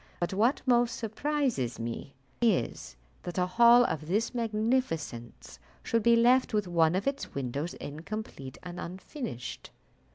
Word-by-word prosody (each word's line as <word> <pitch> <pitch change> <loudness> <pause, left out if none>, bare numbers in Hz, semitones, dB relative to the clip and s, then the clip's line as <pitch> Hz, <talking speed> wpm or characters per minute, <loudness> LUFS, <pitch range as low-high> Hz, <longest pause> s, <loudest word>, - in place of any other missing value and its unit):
But 175 +2 -1
what 225 +8 +2
most 240 -2 +3
surprises 235 - -1
me 115 +4 -5 0.3
is, 175 - 0 0.3
that 175 - -6
a 180 - +3
hall 235 +5 +6
of 155 -5 -3
this 210 +8 0
magnificence 220 - -2 0.2
should 230 - +1
be 235 +2 +5
left 245 0 +4
with 210 -3 +1
one 165 -1 +3
of 195 - -1
its 275 0 -3
windows 140 +5 -3
incomplete 150 -3 -7
and 180 0 -7
unfinished." 180 - -6
200 Hz, 135 wpm, -29 LUFS, 155-235 Hz, 0.3 s, hall